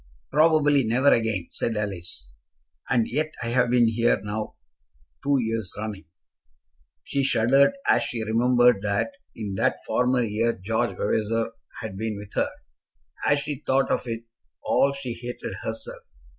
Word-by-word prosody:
"Probably 150 -2 +4
never 125 +5 +4
again," 110 -6 0
said 115 -2 -2
Alice. 85 - -4 0.5
"And 120 -3 +2
yet 155 +5 -2
I 115 - -2
have 125 0 +2
been 120 -1 +4
here 115 +1 +2
now 105 +2 -4 0.7
two 140 0 +3
years 110 -4 -2
running." 105 -2 -5 1.0
She 140 - -1
shuddered 135 - +4
as - - +5
she 115 -2 -3
remembered 120 0 +4
that 100 - 0 0.2
in 105 -3 -4
that - - +2
former 125 0 +2
year 115 +2 0
George 110 +5 -1
Vavasor 115 +2 0 0.3
had 105 -4 -6
been 110 -1 -2
with 100 0 -10
her. - - +1 0.8
As 145 0 +3
she 145 -2 -5
thought 135 +1 +2
of - - 0
it 115 0 -4 0.4
all 140 - +3
she 135 -3 -5
hated 120 +1 -6
herself. - - -6
115 Hz, 145 wpm, -25 LUFS, 110-130 Hz, 1.0 s, as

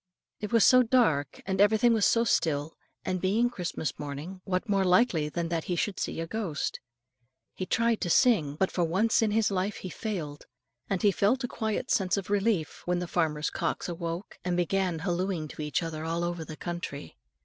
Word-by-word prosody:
It 210 +1 -5
was 230 -3 +5
so 255 0 +7
dark, 220 - +1
and 190 0 0
everything 220 +3 +5
was 220 -3 +3
so 230 - +3
still, 160 -8 0 0.3
and 185 -1 -1
being 225 +6 +2
Christmas 180 -7 -4
morning, 150 +6 -6
what 185 +4 -1
more 200 -2 +2
likely 180 -5 +3
than 170 +1 -3
that 165 -2 -2
he 180 - -1
should 195 +2 -1
see - - -3
a 165 - -2
ghost. 180 -5 -3 0.7
He 185 - -5
tried 230 +1 +1
to 175 - -1
sing, 165 - +3
but 190 +4 0
for 175 - 0
once 195 +9 +2
in 220 - +2
his 215 0 +2
life 195 +2 -1
he 185 - -7
failed; 160 -5 -5 0.4
and 195 -3 -1
he 205 - +6
felt 245 +7 +1
quite 220 -3 -2
a - - -4
sense 185 -3 +1
of 200 0 -4
relief 205 -6 0
when 180 0 +1
the 180 - -2
farmer's 160 -3 0
cocks - - -2
awoke, 170 +2 -5
and 180 -1 -1
began 180 0 0
hallooing 175 -1 -2
to - - -8
each 150 +3 -1
other 160 -1 -4
all 165 +1 -1
over 175 -1 -2
the 155 -1 -9
country. 170 - -6
185 Hz, 200 wpm, -28 LUFS, 165-210 Hz, 0.7 s, so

